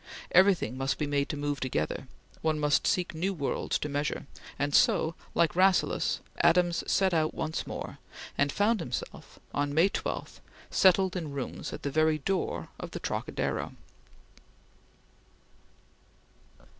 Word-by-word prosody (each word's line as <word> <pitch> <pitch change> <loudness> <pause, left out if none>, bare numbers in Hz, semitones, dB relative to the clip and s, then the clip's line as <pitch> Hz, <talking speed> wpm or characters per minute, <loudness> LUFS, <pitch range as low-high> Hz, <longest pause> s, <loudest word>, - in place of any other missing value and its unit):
Everything 185 - +4
must 135 +1 -1
be 150 - -1
made 145 0 0
to 150 - -3
move 145 -1 -2
together; 130 - -2 0.3
one 155 -1 +1
must 150 -1 +2
seek 180 -2 +1
new 185 +5 -1
worlds 140 -4 -1
to - - -3
measure; 145 0 -2 0.3
and 145 0 -1
so, 160 +3 +4 0.2
like 170 -1 +3
Rasselas, 185 0 +3 0.2
Adams 175 -1 +3
set 190 -2 +3
out 155 -1 +1
once 160 +1 -3
more, - - -6 0.4
and 145 0 +2
found 215 +5 +2
himself 125 -7 -6 0.2
on 145 0 -1
May 170 +5 +5
12 - - -4 0.3
settled 190 0 +4
in 160 -5 -4
rooms 140 -2 -5
at - - -7
the 140 - -2
very 155 +1 +3
door 140 - -2
of - - -6
the - - -6
Trocadero. - - -2
155 Hz, 140 wpm, -29 LUFS, 145-180 Hz, 0.4 s, May